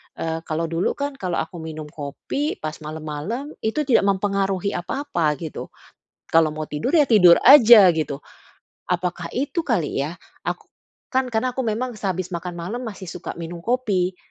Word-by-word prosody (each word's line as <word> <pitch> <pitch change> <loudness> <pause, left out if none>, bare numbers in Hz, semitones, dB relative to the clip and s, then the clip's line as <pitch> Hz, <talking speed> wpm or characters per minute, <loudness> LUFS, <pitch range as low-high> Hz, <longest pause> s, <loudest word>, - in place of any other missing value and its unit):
eee, 160 0 -3
kalau 160 +1 -1
dulu 165 +2 0
kan 285 0 -2
kalau 180 -2 -2
aku 175 - -10
minum 155 -2 -7
kopi 155 - -4
pas 155 0 -4
malem-malem 155 - -5
itu 220 +8 -1
tidak 245 -7 +3
mempengaruhi 195 -1 0
apa-apa 175 - -1
gitu, 155 - -6 0.6
kalau 160 -2 +4
mau 155 0 -5
tidur 150 - -2
ya 300 -5 +4
tidur 180 -7 +7
aja, 235 -7 +9
gitu. 145 -3 -2 0.7
Apakah 180 -1 -2
itu 290 +6 -2
kali 195 - -1
ya? 160 +6 -4 0.2
Aku - - -4 0.5
kan 260 0 +1
karena 245 +2 -1
aku 260 - -2
memang 240 +2 -2
sehabis 185 -3 -3
makan 175 +1 -5
malam 205 +9 -4
masih 205 -5 -7
suka 180 +1 -7
minum 170 0 -7
kopi, 195 -6 0
185 Hz, 160 wpm, -22 LUFS, 165-235 Hz, 0.7 s, aja